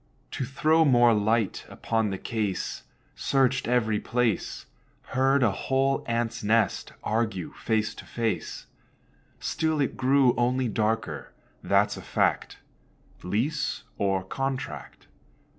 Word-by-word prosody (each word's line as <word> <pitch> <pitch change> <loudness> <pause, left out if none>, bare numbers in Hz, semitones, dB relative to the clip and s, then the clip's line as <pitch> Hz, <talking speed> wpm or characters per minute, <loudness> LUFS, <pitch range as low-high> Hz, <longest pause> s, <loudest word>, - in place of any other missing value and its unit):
To 130 - -3
throw 155 +5 +3
more 120 -5 +5
light 110 0 +1
upon 110 -2 -1
the 95 - -3
case, 105 -3 -3 0.3
Searched 130 -2 +1
every 110 -3 +2
place, 120 -5 -1 0.4
Heard 135 +1 +3
a 110 - +4
whole 135 +5 0
ants' 115 0 -1
nest 110 +2 +1
argue 110 -5 -1
face 110 -1 -1
to - - -11
face, 110 -8 -3 0.7
Still 160 -1 -1
it 140 - 0
grew 130 -1 +4
only 125 +1 +1
darker; 105 - -2 0.3
that's - - +2
a - - -7
fact - - 0 0.6
(Lease 125 - -1 0.2
or 95 -1 +1
contract?) 135 +7 -5
115 Hz, 115 wpm, -27 LUFS, 105-130 Hz, 0.7 s, more